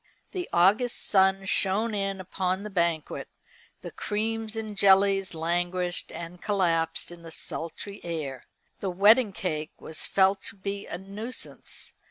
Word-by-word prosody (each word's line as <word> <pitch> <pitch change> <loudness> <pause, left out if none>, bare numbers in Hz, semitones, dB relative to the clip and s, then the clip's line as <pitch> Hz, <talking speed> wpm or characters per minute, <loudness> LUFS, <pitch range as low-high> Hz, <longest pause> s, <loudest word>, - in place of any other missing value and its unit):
The 360 -2 -4
August 205 +8 +4
sun 190 -1 +4
shone 205 +4 +2
in 195 -1 -1
upon 185 +1 -2
the 210 - -6
banquet, 170 -4 0 0.5
the - - -7
creams 220 +1 -2
and 220 -2 -4
jellies 195 -1 +4
languished 175 +2 0
and 170 +1 -8
collapsed 170 -6 +1
in 175 -1 -11
the 165 - -10
sultry 185 +6 -6
air. 155 -6 -4 0.3
The 195 - -2
wedding 205 +5 +5
cake 155 -5 -4
was 160 - -1
felt 195 0 +3
to - - -12
be 200 +1 -5
a - - -4
nuisance. 205 +6 -6
190 Hz, 140 wpm, -27 LUFS, 175-205 Hz, 0.5 s, wedding